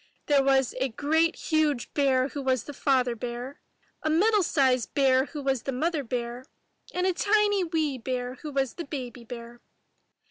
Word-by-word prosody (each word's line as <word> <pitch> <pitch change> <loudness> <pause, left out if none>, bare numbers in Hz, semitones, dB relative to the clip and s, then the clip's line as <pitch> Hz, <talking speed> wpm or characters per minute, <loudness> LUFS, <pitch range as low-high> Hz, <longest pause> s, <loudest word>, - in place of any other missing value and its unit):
There 285 -2 +4
was 270 -2 +3
a 265 +1 +1
great 320 +7 +1
huge 305 -5 0
bear 270 -2 +2
who 285 - -5
was 260 -3 +1
the 290 - -8
Father 255 -3 +1
Bear, 245 +3 -6 0.4
a 310 - -1
middle 410 +7 +4
sized 265 -8 +1
bear 265 -1 +4
who 295 -1 -7
was 270 -3 0
the 270 - -3
Mother 310 +3 -1
Bear, 240 0 -4 0.5
and 360 0 -1
a 375 - +2
tiny 410 +1 +2
wee 315 -6 -1
bear 250 +1 -3
who 300 - -6
was 270 -3 0
the 340 - -6
Baby 255 -4 -6
Bear. 235 0 -9
270 Hz, 175 wpm, -27 LUFS, 250-310 Hz, 0.5 s, There